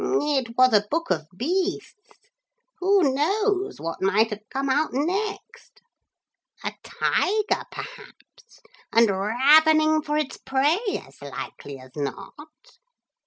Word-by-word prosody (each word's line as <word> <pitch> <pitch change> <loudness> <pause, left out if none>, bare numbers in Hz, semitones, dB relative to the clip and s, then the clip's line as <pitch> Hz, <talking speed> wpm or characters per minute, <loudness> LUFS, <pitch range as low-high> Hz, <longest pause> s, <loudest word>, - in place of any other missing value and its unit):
'It 275 - 0
was 255 -1 +5
a 205 -1 +5
book 330 - -1
of 155 -3 -1
beasts. 360 - -1 0.9
Who 370 -7 +3
knows 395 +6 0
what 165 0 -5
might 210 +4 +2
have 210 0 -8
come 275 +1 -2
out 295 +4 +1
next? 420 - -4 0.8
A - - -3
tiger 425 +1 0
perhaps. - - -12 0.3
And 230 -2 +5
ravening 310 +10 +4
for 300 0 -2
its 300 -3 -2
prey 280 +6 +1 0.3
as - - -20
likely 140 -1 -8
as 130 0 -15
not.' 195 - -8
295 Hz, 120 wpm, -24 LUFS, 225-370 Hz, 0.9 s, was